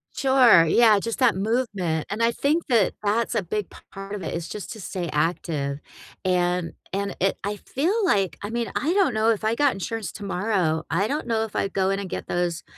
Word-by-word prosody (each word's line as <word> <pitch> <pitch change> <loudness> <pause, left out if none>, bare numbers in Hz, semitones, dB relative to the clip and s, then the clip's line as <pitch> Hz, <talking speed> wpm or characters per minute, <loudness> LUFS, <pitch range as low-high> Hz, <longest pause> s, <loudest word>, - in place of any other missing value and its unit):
Sure. 255 - +6
Yeah, 215 +4 +5
just 230 +4 -4
that 250 -6 +4
movement, 195 -6 -1
and 215 +3 -1
I 230 - +4
think 305 +7 0
that 230 -8 +3
that's 220 +3 0
a 210 - +1
big 205 +3 -3 0.2
part 195 +1 -7
of 195 - -6
it 160 - -4
is 170 0 -4
just 210 - -6
to 220 - -10
stay 175 -2 -4
active, 150 -3 -1 0.5
and 180 -1 +1 0.2
and 200 +1 -2
it 195 +1 +1
I 205 +1 -2
feel 315 - -1
like 195 - +1
I 205 - -5
mean, 235 0 -2
I 315 +7 +1
don't 385 -10 +3
know 220 +1 +2
if 220 -2 0
I 220 - +2
got 285 +3 +2
insurance 220 +2 -4
tomorrow, 190 -5 -1
I 190 +7 +1
don't 290 -2 -3
know 225 -1 +1
if 220 - -7
I'd 195 - -1
go 190 0 +1
in 195 - -1
and 195 -2 -5
get - - -5
those 175 -1 -1
205 Hz, 215 wpm, -24 LUFS, 180-230 Hz, 0.5 s, Sure